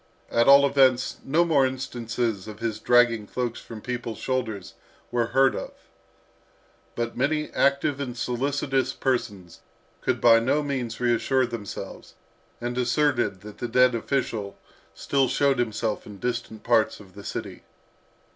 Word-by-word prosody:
At 115 0 +3
all 140 0 +8
events, 135 -2 +3
no 165 +5 +2
more 150 -5 +3
instances 120 -5 -2
of 105 -1 -8
his 110 -1 -3
dragging 120 -3 +3
cloaks 120 0 -3
from 110 -2 -10
people's 120 -2 -4
shoulders 115 -7 -3 0.4
were 120 -1 +1
heard 135 +2 +3
of. - - -6 1.2
But 120 0 -3
many 150 +4 0
active 140 0 +1
and 125 -3 -5
solicitous 135 +2 -1
persons 105 -10 -3 0.4
could - - 0
by 115 -1 +6
no 135 +6 +1
means 130 -5 -3
reassure 125 +2 +2
themselves, 115 -4 -8 0.4
and 120 +1 -3
asserted 125 -5 +1
that 105 0 -11
the 120 - -2
dead 125 +2 +4
official 115 -4 -2 0.4
still 135 -2 +1
showed 140 0 +2
himself 110 -2 -2
in 105 -1 -10
distant 115 -1 -4
parts 115 -2 +2
of 95 -3 -15
the 100 - -11
city. - - -6
120 Hz, 140 wpm, -25 LUFS, 115-135 Hz, 1.2 s, all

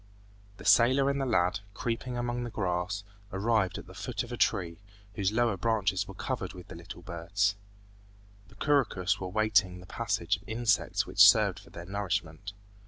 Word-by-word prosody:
The - - -12
sailor 130 +4 +5
and 140 0 -2
the 135 - -1
lad, 90 -6 +2 0.2
creeping 120 +3 -3
among 120 0 -2
the 120 - -4
grass, 95 -1 -2 0.3
arrived 100 -1 +1
at - - -8
the - - -13
foot - - -4
of - - -10
a - - -3
tree, 85 -2 0 0.3
whose 100 -2 0
lower 115 -2 +1
branches 105 -2 0
were 95 - -9
covered 110 -4 -4
with 90 -1 -12
little 85 +1 -10
birds. 95 +4 -1 0.9
The 105 - -19
couroucous 100 -8 +1
were 95 - -4
waiting 100 -2 +2
the 90 - -12
passage 90 +1 -1
of 95 - -19
insects 115 -1 +1
which - - +8
served - - +3
for - - -17
their 85 - -9
nourishment. 95 -2 -3
100 Hz, 170 wpm, -29 LUFS, 90-115 Hz, 0.9 s, which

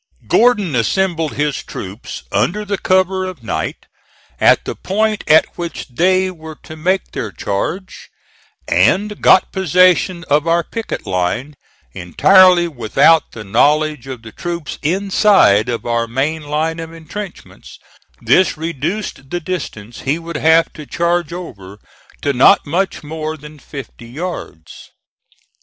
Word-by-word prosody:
Gordon 210 - +3
assembled 165 - 0
his 150 -1 -1
troops 100 +5 -8
under 210 +4 0
the 200 -1 -2
cover 185 0 +1
of 185 -9 -7
night, - - -4 0.5
at - - +4
the - - -3
point 215 +2 -1
at 155 +1 +6
which 170 -4 -5
they 185 +7 +2
were 160 -3 -11
to 155 - -10
make 185 +4 -1
their 110 - -4
charge, 130 - -4 0.6
and 210 +1 +1
got 185 - +5
possession 180 -1 +2
of 150 +3 +2
our 170 +1 +2
picket 230 +6 -6
line, 95 +10 -2 0.4
entirely 180 - +5
without 155 +4 +2
the 110 - -8
knowledge 150 +6 +1
of 130 -4 -7
the 110 - -10
troops 170 +1 -5
inside 185 - +3
of 120 - -3
our 115 -1 0
main 140 +7 -1
line 155 +3 -2
of 165 0 -7
intrenchments; 170 +4 -10 0.5
this 185 -3 +3
reduced 165 -1 -4
the 175 - -2
distance 140 - -6
he 140 +4 -1
would 170 0 -8
have 160 +2 +3
to 150 -2 -10
charge 170 0 0
over 105 - -9 0.5
to 140 - +1
not 135 +10 +5
much 175 +4 -2
more 155 +1 -5
than 150 0 -13
fifty 130 -4 -10
yards. 130 - -8
160 Hz, 135 wpm, -17 LUFS, 135-185 Hz, 0.6 s, at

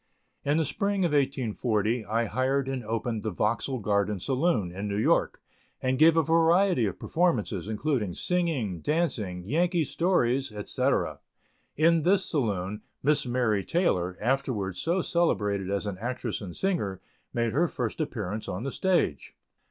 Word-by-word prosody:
In 145 +2 +2
the 160 - +2
spring 200 +4 0
of 170 - 0
1840, 120 -5 0
I 115 +2 +1
hired 130 +4 0
and 135 -2 -3
opened 115 0 -2
the 110 - -2
Vauxhall 115 +6 -1
Garden 100 0 +1
saloon, 130 - 0
in 100 +3 -4
New 100 0 -2
York, 105 - +2 0.4
and 130 -1 0
gave 165 +1 +6
a 165 - +5
variety 165 - +3
of 95 - -4
performances, 120 - 0
including 110 - -1
singing, 155 - -1
dancing, 115 - -1
Yankee 170 - +1
stories, 135 - +1
etc. 105 -1 -1 0.6
In 165 +2 +4
this 185 +4 +3
saloon 105 - -1 0.2
Miss 145 -1 +2
Mary 120 -5 +1
Taylor, 90 - 0
afterwards 110 -6 -1
so 175 +3 +1
celebrated 105 - 0
as 100 +1 -1
an 100 -3 -4
actress 120 0 -3
and 95 -4 -8
singer, 135 - -1 0.3
made 115 -2 0
her 165 +6 +3
first 125 0 -3
appearance 105 -7 -4
on 95 +5 -4
the 140 - -3
stage. 175 - 0
125 Hz, 150 wpm, -27 LUFS, 105-160 Hz, 0.6 s, gave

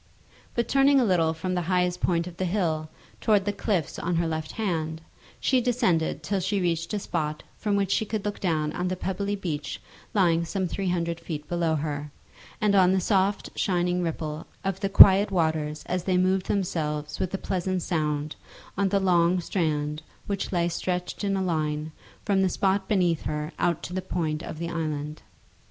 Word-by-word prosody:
But 235 -1 0
turning 275 +1 +5
a 250 - +3
little 170 -5 +3
from 165 +3 -3
the 180 - 0
highest 180 -1 +1
point 170 -2 +1
of 175 -1 -9
the 190 - -1
hill 165 -5 -1 0.3
towards 210 -3 +3
the 205 - 0
cliffs 195 -6 -1
on 175 0 -1
her 165 0 +1
left 160 -1 -3
hand, 160 -7 -2 0.4
she 260 -2 +2
descended 185 - +1
till 195 +5 0
she 195 +2 0
reached 170 -2 -1
a - - +1
spot 155 -6 -3
from 205 -2 -1
which 200 -1 +1
she - - +2
could 215 -1 -4
look 205 - -3
down 155 -5 0
on 180 0 -2
the 185 - -1
pebbly 200 +2 -2
beach 160 -7 -4 0.4
lying 170 -4 +3
some 185 +2 -2
three 190 +2 -2
hundred 170 -1 -1
feet 150 -3 -6
below 170 -2 +1
her, 150 -1 -3 0.5
and 210 -1 +2
on 185 -2 +5
the 190 - +3
soft 195 +1 +1
shining 180 -1 +1
ripple 160 -2 -3 0.2
of 195 -1 -2
the 195 -1 -1
quiet 195 +1 +9
waters 160 -4 0
as 180 -1 -2
they 185 -2 +2
moved 185 +1 +2
themselves 150 -6 -2
with 185 - -1
a - - -1
pleasant 185 -1 -2
sound 150 -2 -1 0.4
on 195 0 +1
the 200 +1 +2
long 180 -1 +3
strand 155 -4 -1 0.2
which 200 -1 -3
lay 170 -2 +1
stretched 180 +3 -3
in 195 -1 +1
a 190 - 0
line 155 -3 -1 0.3
from 200 -2 +2
the 190 - +3
spot 190 +1 +1
beneath 175 -6 +2
her 150 +1 -3
out 175 -2 +1
to 180 - -6
the 185 - -1
point 160 -4 -2
of - - -7
the 170 +1 -3
island. 155 -2 -3
180 Hz, 190 wpm, -26 LUFS, 160-195 Hz, 0.5 s, quiet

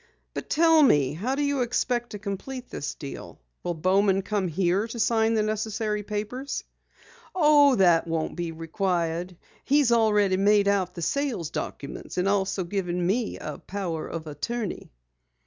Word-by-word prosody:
"But - - -6
tell 325 0 +5
me, 145 - +4
how 230 - -2
do 290 - 0
you 285 -2 0
expect 240 0 0
to 210 - -6
complete 220 +6 -6
this 145 - -4
deal? 140 -3 -9 0.2
Will 175 - -2
Bowman 190 +3 +2
come 200 -1 -1
here 185 +5 +1
to 235 +1 -7
sign 225 0 +2
the 215 - +2
necessary 215 0 -2
papers?" 215 +7 -4 0.7
"Oh, 295 -5 +6
that 175 -4 +4
won't 165 -1 -2
be 175 -1 -3
required. 170 +1 -2 0.3
He's 285 -3 +3
already 210 -4 +3
made 205 +1 +4
out 195 -3 +1
the 170 - -5
sales 245 - -1
documents, 140 - -6
and 180 +1 +1
also 195 -1 +1
given 180 -1 -2
me 215 +5 0
a 150 -2 -6
power 180 -5 -4
of 165 -1 -6
attorney." 200 +8 -4
200 Hz, 155 wpm, -26 LUFS, 175-235 Hz, 0.7 s, Oh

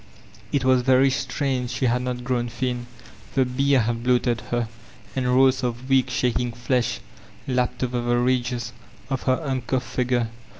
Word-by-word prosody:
It 135 -3 0
was 130 -1 +4
very 130 +1 +4
strange 130 -1 -1
she 125 +2 -1
had 125 +1 +2
not 125 -1 -3
grown 120 -1 -1
thin; 125 0 -3 0.5
the 135 -2 +4
beer 135 +1 +2
had 115 +1 -1
bloated 120 -2 +2
her, 120 -1 0 0.5
and 130 -2 0
rolls 130 +1 +4
of 120 +1 -3
weak, 130 -1 +3
shaking 125 -1 0
fledi 120 0 -1 0.5
bpped 125 -1 0
over 125 -1 -1
the 120 0 +1
ridges 125 -1 0 0.4
of 135 - -1
her 130 - +4
uncoutfi 130 -4 -1
figure. 125 -1 0
125 Hz, 160 wpm, -24 LUFS, 120-130 Hz, 0.5 s, was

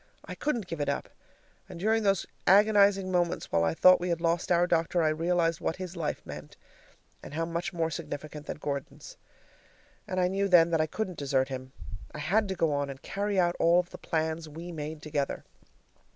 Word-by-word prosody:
I - - -7
couldn't 245 -9 -2
give 165 -4 -5
it 145 - 0
up, - - -2 0.6
and 170 - -9
during 220 +4 +2
those 195 -4 +1 0.2
agonizing 200 -1 +5
moments 175 -1 0
while 85 - +2
I 80 -1 +1
thought 185 0 +7
we 180 +1 -2
had 170 -1 0
lost 170 +1 0
our 175 0 +4
doctor, 170 0 +1
I 155 - +3
realized 165 +1 +1
what 160 - -1
his 185 -1 -7
life 160 -3 -3
meant, - - -9 0.6
and 145 - -9
how 165 +1 0
much 170 +1 -3
more 165 -2 -1
significant 150 0 -6
than - - -4
Gordon's. 145 - -6 0.9
And 185 -2 -2
I 180 - +3
knew 195 +2 0
then 170 -3 +6
that 165 -1 +3
I 155 - +1
couldn't 185 0 -4
desert 135 -2 +1
him. 130 0 -6 0.4
I - - -5
had 195 +9 +1
to 190 - -3
go 165 -3 +1
on 145 0 -1
and 135 -1 -7
carry 200 0 -1
out 175 -1 +2
all 170 +1 +5
of 180 0 -3
the - - -10
plans 160 -1 -2
we 165 +4 -8
made 155 -1 -6
together. 145 -2 -2
170 Hz, 205 wpm, -29 LUFS, 155-185 Hz, 0.9 s, thought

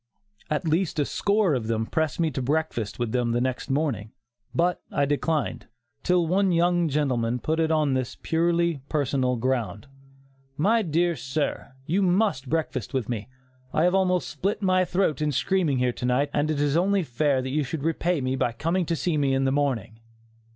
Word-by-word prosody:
At 155 +2 -1
least 165 +2 0
a 145 - +2
score 200 -1 +1
of 120 -5 -2
them 110 -1 0
pressed 160 +2 -1
me 165 -2 +1
to 130 - -3
breakfast 140 -5 -1
with 120 -2 -2
them 120 -1 0
next 125 +3 -1
morning, 135 -7 -1 0.4
but 175 +1 +1
I 145 - +1
declined, 145 +1 -1 0.3
till 180 -1 +2
one 190 +3 +2
young 175 0 +2
gentleman 125 -5 0
put 160 +6 -1
it 160 -1 +2
on 155 -3 +2
this 130 -2 -2
purely 170 -2 +1
personal 135 -4 +1
ground: 115 -4 -2 0.7
"My 220 +9 +3
dear 170 -1 +1
sir, 140 -1 -3
you 175 +7 +1
must 185 - +1
breakfast 160 -2 -2
with 125 -4 -1
me; 115 -1 -4 0.4
I 155 - +2
have 180 +1 +3
almost 185 -2 +2
split 195 +8 -2
my 185 -1 +3
throat 175 -4 0
in 150 -1 +1
screaming 165 -1 +1
here 125 -1 +1
to 125 - -5
night 140 +3 +1
and 150 +1 +1
it 155 -2 0
is 145 0 +1
only 195 +2 +2
fair 140 0 +1
that 130 - -4
you 150 +2 +1
should 140 +2 -5
repay 165 0 0
me 130 0 -1
by 120 -2 0
coming 165 +8 -1
to 165 - 0
see 165 0 -1
me 140 -2 +2
in 135 - +1
the 135 - +2
morning." 130 -6 -1
150 Hz, 190 wpm, -25 LUFS, 130-170 Hz, 0.7 s, My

